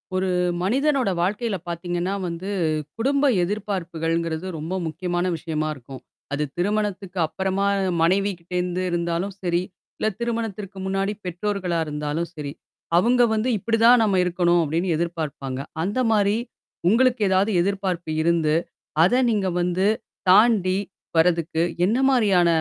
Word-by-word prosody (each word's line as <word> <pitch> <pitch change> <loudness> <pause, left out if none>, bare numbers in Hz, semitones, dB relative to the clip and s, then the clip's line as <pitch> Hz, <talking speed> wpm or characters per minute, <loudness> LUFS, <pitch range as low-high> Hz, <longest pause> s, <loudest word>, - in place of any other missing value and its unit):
ஒரு 185 0 0 0.3
மனிதனோட 270 +3 +2
வாழ்க்கையில 205 +3 -1
பார்த்தீங்கன்னா 175 +2 -2
வந்து, 170 +3 -5 0.5
குடும்ப 275 +5 +1 0.2
எதிர்பார்ப்புகள்ங்கிறது 170 -4 -2
ரொம்ப 160 +4 -5
முக்கியமான 175 +2 -2
விஷயமா 155 -2 -2
இருக்கும். 135 0 -11 0.3
அது 145 +1 0
திருமணத்துக்கு 200 0 -1
அப்புறமா 190 +4 -1 0.4
மனைவி 195 +4 +2
கிட்ட 170 +2 -13
இருந்து 180 +1 -1
இருந்தாலும் 170 +3 -1
சரி, 175 -1 +1 0.4
இல்ல, - - 0
திருமணத்திற்கு 225 -4 -3
முன்னாடி 195 +1 -1
பெற்றோர்களாக 180 -2 -1
இருந்தாலும் 150 +3 -3
சரி, 145 -2 -5 0.5
அவங்க 240 +7 +4
வந்து 220 +3 0
"இப்படி 225 +3 0
தான் 240 0 +7
நாம 200 -3 +2
இருக்கணும்." 175 -1 +2
அப்படின்னு 165 +4 -1
எதிர்பார்ப்பாங்க. 155 -6 -3 0.2
அந்த 205 +8 -1
மாரி 205 -1 +3 0.5
உங்களுக்கு 245 +2 +3
ஏதாவது 190 +3 +2
எதிர்பார்ப்பு 185 -3 -2
இருந்து, 165 -2 +2 0.5
அதை 245 +9 +4
நீங்க 205 -3 0
வந்து 180 +2 0 0.4
தாண்டி, 195 -2 +5 0.4
வர்றதுக்கு, 165 -1 +2 0.2
என்ன 215 +6 +2
மாரியான 205 -9 +4
185 Hz, 120 wpm, -23 LUFS, 170-205 Hz, 0.5 s, தான்